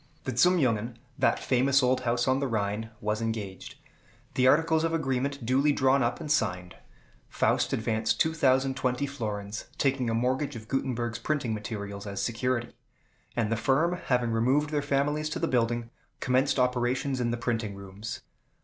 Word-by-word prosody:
The 130 - -3
Zum 180 +8 +5
Jungen, 115 -5 0 0.2
that - - +3
famous 135 +2 +2
old 130 0 +2
house 120 0 0
on 130 +1 +3
the 140 - 0
Rhine, 110 -1 -2
was 105 +1 -1
engaged; 110 -4 -4 0.6
the 130 0 +3
articles 160 +3 +4
of 165 0 +1
agreement 135 -3 -1
duly 135 +5 +3
drawn 135 -1 +3
up 120 - 0
and 150 - -4
signed. 90 - 0 0.5
Faust - - +1
advanced 110 0 0
2,020 135 -3 +2
florins, 105 -6 -5
taking 130 -3 +1
a 115 - 0
mortgage 130 +4 0
of 110 -1 -9
Gutenberg's 120 -3 -2
printing 140 -7 -1
materials 100 -2 -5
as 100 -1 -4
security; 120 +2 -1 0.6
and 115 -2 0
the - - +3
firm, 135 +10 +2
having 125 -2 +2
removed 130 +7 +2
their 150 -1 +1
families 145 +2 0
to - - -3
the - - 0
building, 120 -1 0 0.3
commenced 130 +3 +2
operations 125 +1 +1
in 120 - 0
the 120 - -1
printing 115 -4 -2
rooms. 100 +2 -7
125 Hz, 160 wpm, -28 LUFS, 115-135 Hz, 0.6 s, Zum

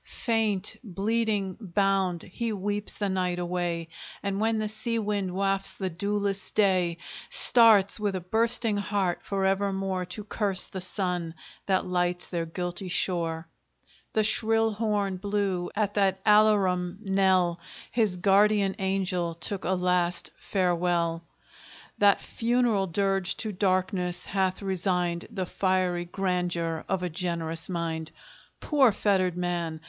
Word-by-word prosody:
Faint, 215 -4 -1
bleeding, 205 -1 -1
bound, 195 -2 0
he 230 +5 -4
weeps 205 0 -3
the 205 - -2
night 185 -2 -1
away, 175 -1 -2 0.4
And 200 0 -2
when 220 +1 +1
the 215 0 -1
sea 215 +2 -1
wind 205 -3 -1
wafts 195 +1 0
the 190 -2 -3
dewless 200 +2 -2
day, 185 -5 +2 0.3
Starts, 220 -4 +5
with 205 -2 -1
a - - -1
bursting 225 +3 +1
heart, 200 -3 -1
for 195 -1 -2
evermore 195 -1 0
To 180 +4 -6
curse 200 -3 +1
the 190 - -6
sun 180 -3 -2 0.3
that 190 -1 +1
lights 180 -1 -1
their 170 -2 -3
guilty 175 +2 -5
shore! 170 -2 -1 0.7
The 215 - +2
shrill 225 +1 +3
horn 205 -3 -1
blew; 195 -2 -1
at 205 -1 0
that 195 -2 +1
alarum 195 -4 +3
knell 190 -3 +2 0.3
His 215 -6 +1
guardian 200 +1 +3
angel 185 -3 -1
took 190 +3 -2
a 185 - +1
last 180 -1 +2
farewell. 175 -3 0 0.7
That 200 -1 +4
funeral 230 -4 0
dirge 195 +1 0
to 215 - -3
darkness 185 -2 0
hath 190 0 -1
resigned 180 -2 -1
The 195 -5 -3
fiery 185 -1 0
grandeur 175 -3 -2
of 190 -1 -1
a 180 - -1
generous 165 -1 -3
mind. 165 -2 -3 0.5
Poor 275 -6 +3
fettered 190 -3 +1
man! 175 -3 -2
190 Hz, 130 wpm, -27 LUFS, 180-205 Hz, 0.7 s, Starts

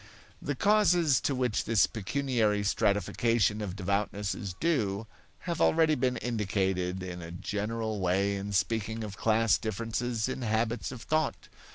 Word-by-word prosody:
The 145 - -2
causes 180 -7 +3
to 140 - 0
which 125 -4 0
this 110 -4 +4
pecuniary 110 -2 0
stratification 105 +1 +1
of 95 -3 -4
devoutness 100 +1 -1
is 95 -3 -6
due 110 - 0 0.4
have 170 -2 -3
already 160 -1 +4
been 125 -3 0
indicated 95 -5 -1
in 90 -1 -6
a 85 - -8
general 105 +4 -3
way 95 +2 +1
in 100 +1 -4
speaking 110 +3 -1
of 105 -2 -6
class 110 +1 +2
differences 115 +2 -2
in 130 0 -4
habits 115 +1 -1
of 125 -3 -8
thought. 155 0 -1
110 Hz, 145 wpm, -29 LUFS, 100-125 Hz, 0.4 s, this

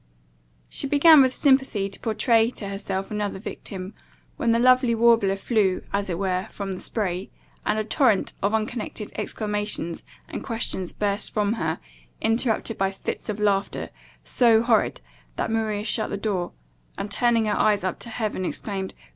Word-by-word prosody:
She - - -3
began 295 +2 +7
with 260 -1 +4
sympathy 265 -8 +3
to 195 - -8
pourtray 225 0 +2
to 200 - -6
herself 195 0 -4
another 210 -2 -2
victim, 190 -1 -7 0.4
when 235 - +1
the 230 - +4
lovely 250 0 +4
warbler 225 -4 +4
flew, 195 -2 +1
as 200 -1 0
it 170 - -1
were, 185 0 -1
from 200 -1 -5
the 185 - -5
spray, 190 -4 -3 0.4
and - - +2
a 215 - 0
torrent 225 -2 +2
of 200 - +1
unconnected 220 -1 -3
exclamations 210 -5 -2 0.3
and - - -6
questions 225 -6 -2
burst 205 0 -1
from 210 0 +1
her, 230 - -2 0.4
interrupted 225 -1 0
by 195 0 +2
fits 195 +2 -5
of 210 0 -3
laughter, 200 -2 0 0.3
so 230 -2 +4
horrid, 230 - +2 0.3
that - - -2
Maria 215 -2 -1
shut 220 0 0
the 200 - -3
door, 195 -4 -2 0.4
and, 200 - -4
turning 230 +1 +3
her 210 - +1
eyes 210 -3 +2
up 185 -2 -2
to 235 - -5
heaven, 215 -4 -2
exclaimed 190 +1 -4
"Gracious - - -27
God!" - - -23
210 Hz, 170 wpm, -24 LUFS, 195-230 Hz, 0.4 s, began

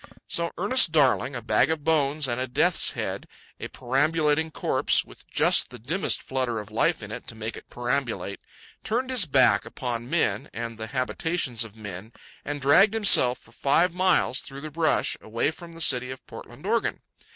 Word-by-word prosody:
So 170 0 -1
Ernest 205 0 +4
Darling, 135 -3 +2
a 120 - -5
bag 115 - +2
of 160 -2 -2
bones 150 -2 +1
and 120 0 -2
a 130 - -2
death's 125 - +3
head, - - -5 0.3
a - - -5
perambulating 150 +4 0
corpse, - - +1
with - - -17
just - - +3
the - - -10
dimmest 160 - 0
flutter 130 -3 -2
of 105 0 -7
life 150 +5 0
in 105 - -8
it - - -8
to 120 - -5
make 110 0 -4
it - - -13
perambulate, 120 -5 -3 0.4
turned 255 +4 -2
his 245 -8 +4
back 130 -8 +3
upon 120 -1 -5
men 110 -11 0
and 115 -1 -6
the 110 - -5
habitations 130 0 -1
of 110 -2 -11
men 105 0 -9 0.3
and 145 0 -5
dragged 195 +10 +5
himself 180 - +5
for 110 - -21
five 165 +8 +1
miles 180 -8 +2
through 140 0 -9
the 155 +1 -7
brush, 160 +1 +1
away 115 +7 -1
from 170 +1 -12
the 165 - -12
city 125 -4 +4
of 130 0 -9
Portland, - - -12
Oregon. - - -1
135 Hz, 185 wpm, -25 LUFS, 120-160 Hz, 0.4 s, dragged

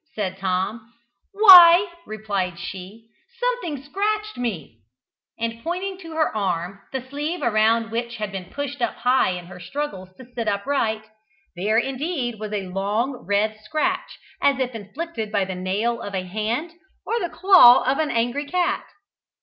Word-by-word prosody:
said 190 -3 -2
Tom. 195 +5 -2 0.4
"Why," 375 -2 +9 0.2
replied 200 -5 -3
she, 190 +5 -9 0.3
"something 485 - -2
scratched 425 +7 -2
me;" 185 - -5 0.6
and 230 0 -4
pointing 370 +3 -3
to 330 -3 -10
her 315 -7 0
arm, 190 -1 -2
the 260 -1 -5
sleeve 295 +6 -4
around 225 0 +2
which 235 +1 -3
had 210 -3 -4
been 190 -2 -6
pushed 285 +5 -6
up 235 - 0
high 250 -2 +2
in 180 -1 -7
her 180 0 -11
struggles 190 -3 -5
to 260 - -12
sit 230 -2 -4
upright, 220 +1 -1 0.5
there 205 +5 0
indeed 265 - -2
was 215 -1 -6
a 205 -2 -3
long, 210 +7 -2
red 215 +2 0
scratch 310 - -2 0.2
as 280 -1 +3
if 255 -1 -1
inflicted 225 - -6
by 200 -2 +1
the 190 - -5
nail 200 +6 -2
of 200 -1 -6
a 185 - -2
hand 220 - -3 0.3
or 470 - -1
the 350 - -3
claw 360 -11 +7
of 265 +3 0
an 310 -1 +1
angry 245 +5 -1
cat. 355 +3 0
230 Hz, 160 wpm, -23 LUFS, 205-295 Hz, 0.6 s, Why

